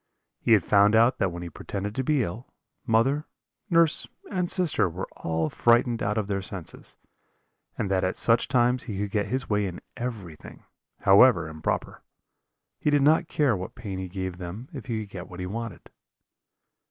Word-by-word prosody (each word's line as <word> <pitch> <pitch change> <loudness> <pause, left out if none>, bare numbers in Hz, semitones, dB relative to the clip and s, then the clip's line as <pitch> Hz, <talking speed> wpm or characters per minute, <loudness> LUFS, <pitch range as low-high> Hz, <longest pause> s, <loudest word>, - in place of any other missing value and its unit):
He 115 - +3
had 100 -6 +4
found 100 +1 +5
out 115 +3 +4
that 95 - +1
when 85 0 -6
he 85 - -6
pretended 100 +6 -5
to 130 - -2
be 145 -1 +2
ill, 110 +7 -6 0.4
mother, 135 +7 +2 0.4
nurse, 165 -3 +3 0.2
and 180 -3 -1
sister 175 - +2
were 90 +3 -5
all 80 -1 -2
frightened 120 0 +3
out 105 +2 0
of 110 - 0
their 100 -1 -2
senses, 95 -3 -7 0.8
and 100 - -2
that 95 -1 +2
at 95 - 0
such 115 0 +3
times 125 -1 +2
he 105 -6 -5
could 100 0 -3
get 100 -2 0
his 130 +5 -2
way 105 -1 +1
in 90 -1 -6 0.2
everything, 105 -10 -7 0.4
however 100 -3 +6
improper. 80 -1 -3 0.8
He - - +1
did 145 -1 +3
not 160 +3 +4
care 140 -7 +2
what 95 -1 -6
pain 100 -6 -6
he 95 - -4
gave 95 -1 -4
them 95 +8 -7
if 135 -3 -8
he 115 -3 -2
could 100 -2 -9
get 90 -2 -8
what 90 - -10
he 90 - -3
wanted. 115 +3 -6
105 Hz, 185 wpm, -26 LUFS, 95-125 Hz, 0.8 s, however